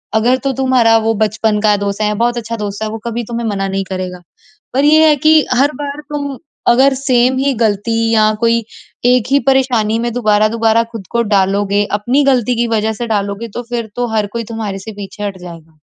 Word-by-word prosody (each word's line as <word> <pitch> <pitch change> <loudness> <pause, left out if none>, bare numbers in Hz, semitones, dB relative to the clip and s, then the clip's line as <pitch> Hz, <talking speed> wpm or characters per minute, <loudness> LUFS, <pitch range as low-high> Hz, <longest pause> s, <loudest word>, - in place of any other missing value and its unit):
अगर 245 +4 +3
तो 275 - +2
तुम्हारा 255 -4 +3
वो 225 - +3
बचपन 215 0 0
का 210 -1 +3
दोस्त 200 +1 -3
है 210 - +2
या 210 - -1
बहुत 240 +2 0
अच्छा 230 0 -4
दोस्त 205 0 -4
है, 215 - -2
वो 225 - -5
कभी 235 +1 -3
तुम्हें 235 0 -4
मना 195 -1 -2
नहीं 195 0 -2
करेगा। 185 -1 -5 0.5
पर 270 +2 +1
ये 310 +1 +6
है 300 - +4
कि 310 +2 +4
हर 280 +4 +3
बार 285 +1 -5
तुम 285 -2 -4 0.3
अगर 265 +3 +4
सेम 255 -1 +2
ही 275 0 +1
गलती 220 0 0 0.2
या 215 -1 +4
कोई 230 0 +2 0.4
एक 250 -2 +3
ही 280 - +5
परेशानी 250 -5 +2
में 235 0 -2
दोबारा-दोबारा 225 0 +2
खुद 215 -6 -8
को 235 0 +1
डालोगे, 200 0 +1
अपनी 240 +8 +1
गलती 250 -3 +2
की 235 0 +1
वजह 220 -1 0
से 235 +3 -5
डालोगे, 205 +1 -2
तो 240 +4 -6
फिर 235 -3 -3
तो 245 0 0
हर 210 -1 +1
कोई 230 0 -3
तुम्हारे 210 -3 -4
से 220 +3 -8
पीछे 200 +1 -8
हट 200 -2 -4
जाएगा। 165 -3 -12
225 Hz, 210 wpm, -15 LUFS, 205-245 Hz, 0.5 s, ये